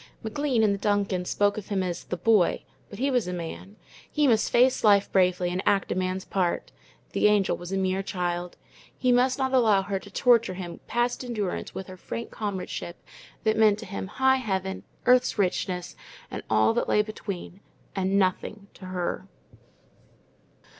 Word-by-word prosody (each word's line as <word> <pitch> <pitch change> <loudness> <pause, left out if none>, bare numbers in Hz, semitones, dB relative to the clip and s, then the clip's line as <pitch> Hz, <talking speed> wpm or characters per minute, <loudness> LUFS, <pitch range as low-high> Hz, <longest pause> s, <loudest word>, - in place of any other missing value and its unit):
McLean 245 +1 0
and 205 -2 +3
the 200 - -4
Duncans 200 -3 0
spoke 205 +1 +1
of 205 - -11
him 195 -2 0
as 175 -2 -4
"the 180 - -4
boy," 205 -1 +3 0.3
but 200 - -9
he 275 +4 0
was 245 -7 +1
a 180 - -3
man. 180 +3 -7 0.4
He 300 -1 +2
must 225 -4 +3
face 250 +2 +4
life 200 -2 +4
bravely 180 -1 +2
and 180 +1 -1
act 195 -1 +1
a - - 0
man's 185 0 -2
part. 180 -3 -1 0.4
The - - +3
Angel 205 -2 +3
was 175 +1 -8
a 195 - 0
mere 190 0 0
child. 180 -2 -3 0.4
He 255 - +2
must 250 +1 +3
not 265 -1 -1
allow 220 -6 +4
her 195 0 -2
to 200 - -13
torture 230 -2 +3
him 175 -2 -7
past 240 +2 0
endurance 215 -7 -3
with 190 - -5
her 185 +1 -11
frank 230 +5 -6
comradeship 190 -4 -5 0.5
that 220 0 +2
meant 215 -2 +5
to 225 - -8
him 195 -1 -5
high 265 +5 +3
heaven, 190 -6 -2 0.2
earth's 250 -1 +4
richness, 180 -2 -1 0.4
and - - -4
all 110 +1 +4
that - - -1
lay 210 - +4
between, 200 -3 -7 0.4
and 190 0 +1
NOTHING 200 +2 -1
to 185 - -12
her. 180 -1 -3
200 Hz, 180 wpm, -26 LUFS, 185-225 Hz, 0.5 s, meant